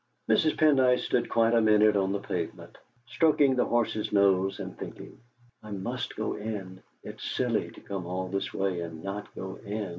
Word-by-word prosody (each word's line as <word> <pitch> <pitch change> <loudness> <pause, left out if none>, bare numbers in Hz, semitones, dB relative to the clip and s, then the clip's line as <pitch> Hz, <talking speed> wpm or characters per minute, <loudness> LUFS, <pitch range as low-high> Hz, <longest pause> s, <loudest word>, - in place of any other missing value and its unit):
Mrs. 155 - +3
Pendyce 130 -5 +4
stood 120 - 0
quite 115 0 +3
a 115 - +5
minute 105 -1 +5
on 95 -1 +1
the 100 - 0
pavement, 90 -4 -5 0.3
stroking 140 +1 +3
the 125 - +2
horse's 115 -2 0
nose 95 -1 +3
and - - -6
thinking: - - -9 0.3
'. - - -49
must 100 -3 -5
go - - -2
in; 100 -4 -6 0.2
it's - - -9
silly - - -1
to - - -14
come 95 -3 -5
all 95 +1 -3
this 100 +1 -3
way 95 -2 -1
and 80 -1 -7
not 100 +1 -5
go 95 0 -6
in!' 105 -1 -4
100 Hz, 180 wpm, -28 LUFS, 95-115 Hz, 0.3 s, a